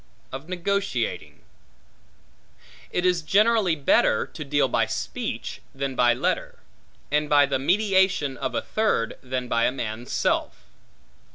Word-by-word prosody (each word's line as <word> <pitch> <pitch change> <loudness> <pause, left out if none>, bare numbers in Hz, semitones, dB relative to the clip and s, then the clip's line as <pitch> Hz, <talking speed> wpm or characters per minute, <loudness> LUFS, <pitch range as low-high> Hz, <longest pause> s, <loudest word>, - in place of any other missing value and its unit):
Of 135 +5 -8
Negotiating 185 - -2 1.5
IT 180 - -1
IS 180 -1 +2
generally 205 +1 +3
better 140 -6 +3
to 155 - -8
deal 145 0 +1
by - - +1
speech - - -4
than 135 -1 -3
by 120 -1 +4
letter; - - -2 0.5
and 150 0 +1
by 145 -1 +6
the 140 -1 -1
mediation 190 -3 +2
of 125 -1 -4
a - - -1
third 215 - -1
than 125 -1 -4
by 115 -1 +2
a - - +2
man's 120 -2 -5
self. - - -1
145 Hz, 130 wpm, -25 LUFS, 130-185 Hz, 1.5 s, by